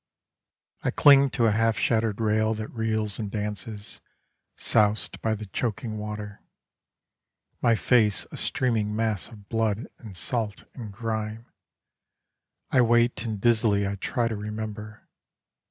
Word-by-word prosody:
I - - 0
cling 140 -1 +6
to 120 -2 +1
a 110 - +4
half 115 +1 +2
shattered 110 -2 +1
rail 110 0 +2
that 110 0 -5
reels 110 -2 0
and 105 -2 -3
dances, 105 0 -5 0.6
Soused 105 0 +1
by 110 -1 +1
the 110 0 -7
choking 110 +1 -3
water, 105 -1 -6 1.2
My 115 - +4
face 110 -3 +3
a - - -7
streaming 110 -5 0
mass 110 -3 -1
of 105 -4 -14
blood 110 0 -1
and 105 -6 -9
salt 110 +4 -2
and 115 -5 -8
grime, 110 +1 -4 1.3
I 130 - +5
wait 120 +1 +3
and 110 -3 -3
dizzily 110 -3 +3
I 100 - -2
try 115 +4 -1
to 115 - -2
remember. 105 0 -6
110 Hz, 135 wpm, -26 LUFS, 105-115 Hz, 1.3 s, cling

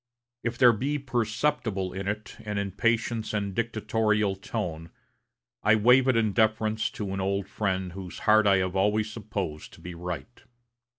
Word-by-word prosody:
If 120 0 -2
there 120 -2 +7
be 140 +7 -1
perceptible 115 -5 -1
in 95 +1 -4
it 105 +1 -4
an 105 -2 -4
impatient 110 +3 0
and 100 -2 -1
dictatorial 110 -2 0
tone, 90 -5 -4 0.7
I 110 +1 +5
waive 125 +4 +5
it 130 -3 +4
in 110 -3 +2
deference 110 0 +1
to 100 -3 -4
an 95 - -2
old 100 0 -1
friend 95 -3 -2
whose 95 -2 -8
heart 110 -1 +5
I 100 -1 +5
have 95 0 -1
always 105 +2 +1
supposed 100 -8 -5
to - - -14
be 90 - -8
right. 90 +7 -6
105 Hz, 160 wpm, -27 LUFS, 95-110 Hz, 0.7 s, there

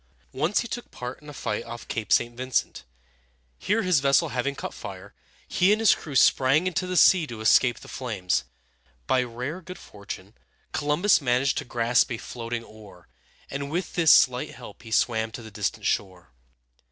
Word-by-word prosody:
Once 210 - +1
he 235 - -5
took 240 +1 -6
part 125 +2 -7
in 150 - -12
a - - -7
fight 115 -6 -3
off 120 0 -9
Cape 110 -3 -4
St. 120 0 +3
Vin´cent. 130 0 -2 0.8
Here, 220 +3 0
his 180 -5 +3
vessel 140 0 +3
having 130 +3 -2
caught - - -6
fire, 95 +1 -9 0.3
he 185 +3 +3
and 215 - +3
his 225 -3 +6
crew 145 -4 -7
sprang 135 +5 +4
into 185 0 -1
the 180 0 -2
sea 170 -1 +6
to 115 -4 -8
escape 120 +3 +3
the - - -12
flames. 95 - -2 0.6
By 130 - +2
rare 125 +8 -5
good 180 +1 -9
fortune, 100 -1 -10 0.4
Columbus 155 +6 +2
managed 125 +1 +1
to - - -7
grasp 120 +1 +1
a 120 - -2
floating 115 0 -6
oar, 105 - -15 0.4
and 140 0 -4
with 175 +5 -3
this 165 -3 +5
slight 125 -1 +4
help - - -12
he 115 - -12
swam 110 0 +1
to 120 - -8
the 110 - -11
distant 100 -1 -3
shore. 90 -8 -2
125 Hz, 180 wpm, -25 LUFS, 115-155 Hz, 0.8 s, his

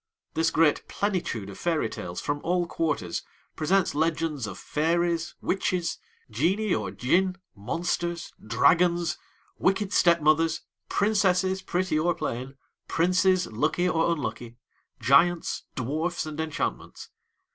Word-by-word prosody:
This 160 0 +2
great 160 -2 +2
plenitude 180 - -2
of - - -11
fairy 165 -8 +1
tales 90 -4 -6
from 145 0 -2
all 175 0 +1
quarters 145 - -2 0.3
presents 180 +4 +2
legends 160 -4 0
of 95 -2 -7
fairies, 170 +2 0
witches, 180 -2 -1 0.3
genii 180 - +1
or 105 -4 -1
Djinn, 175 - +1 0.2
monsters, 170 - -3
dragons, 170 +9 +3 0.4
wicked 195 +1 +1
step 170 -1 +5
mothers, 160 +1 +2 0.3
princesses, 190 -2 +2
pretty 180 -3 0
or 170 +2 +1
plain, 130 +3 -4 0.3
princes 185 +1 +3
lucky 155 +10 0
or 165 -1 +2
unlucky, 125 -6 -4 0.4
giants, 165 +5 +3
dwarfs, 155 +9 -2
and 155 0 -4
enchantments. 160 -2 -4
165 Hz, 115 wpm, -27 LUFS, 145-180 Hz, 0.4 s, step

